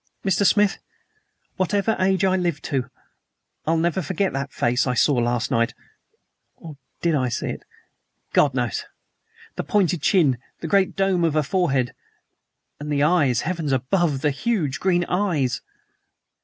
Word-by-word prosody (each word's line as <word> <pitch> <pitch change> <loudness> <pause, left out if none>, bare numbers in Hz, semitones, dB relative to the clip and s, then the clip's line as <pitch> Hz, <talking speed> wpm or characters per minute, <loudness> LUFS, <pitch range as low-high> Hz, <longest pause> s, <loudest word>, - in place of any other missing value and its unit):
Mr. 195 +1 +2
Smith, 205 +1 +3 0.8
whatever 200 +3 +1
age 190 +1 +2
I 190 -1 +3
live 175 -5 -1
to, 130 -4 -2 0.8
I'll 165 +1 +2
never 170 +2 0
forget 185 +4 -1
that 135 0 -3
face 125 +3 +1
I 125 - 0
saw 145 - +3
last 120 -1 0
night 115 +1 +1 0.8
or 160 -4 -11 0.3
did 170 -1 +2
I 130 -4 +1
see 120 - -3
it? - - -6 0.7
God 140 -3 +3
knows! 120 -4 -2 0.7
The - - -2
pointed 180 -5 +1
chin, 140 -6 +3 0.2
the 165 - -5
great 195 +2 +2
dome 195 -3 +1
of 160 -2 +1
a 155 - +3
forehead, 135 -7 0 0.9
and 150 +1 -5
the 145 -1 +2
eyes 150 -7 +3
heavens 165 -3 -2
above, 135 +3 +1
the 150 - +2
huge 155 - -1
green 175 -2 +1
eyes!" 160 -10 0
160 Hz, 150 wpm, -23 LUFS, 135-185 Hz, 0.9 s, Smith